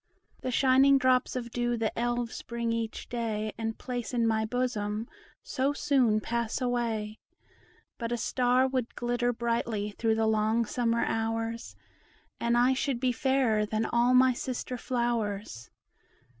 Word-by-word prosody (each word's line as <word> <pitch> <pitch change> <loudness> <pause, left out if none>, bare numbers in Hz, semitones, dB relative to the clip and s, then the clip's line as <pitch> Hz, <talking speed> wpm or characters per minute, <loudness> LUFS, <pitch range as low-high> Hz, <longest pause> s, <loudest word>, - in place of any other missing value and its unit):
The - - -3
shining 270 +2 +5
drops 255 -1 +2
of 240 -2 -4
dew 240 0 0
the 225 -1 -1
Elves 240 0 -2
bring 235 -1 -2
each 225 -1 -4
day 220 -3 -2
And 225 -1 -3
place 245 -1 -4
in 235 -1 +2
my 220 -1 +1
bosom, 220 -2 -2 0.4
so 270 +2 0
soon 255 -7 +2
pass 235 +2 -2
away; 230 -4 -2 0.8
But 230 -1 -3
a 240 - 0
star 250 +2 +2
would 255 -3 -2
glitter 245 0 0
brightly 230 -3 -1
through 220 +2 0
the 225 0 +1
long 220 +1 +2
summer 235 +1 0
hours, 225 +1 -2 0.6
And 235 0 +1
I 250 +2 +4
should 260 -1 -1
be 255 0 +2
fairer 250 -4 +2
than 215 +1 -1
all 240 +2 +3
my 255 0 +6
sister 250 +1 -4
flowers. 215 - -2
235 Hz, 145 wpm, -29 LUFS, 225-250 Hz, 0.8 s, my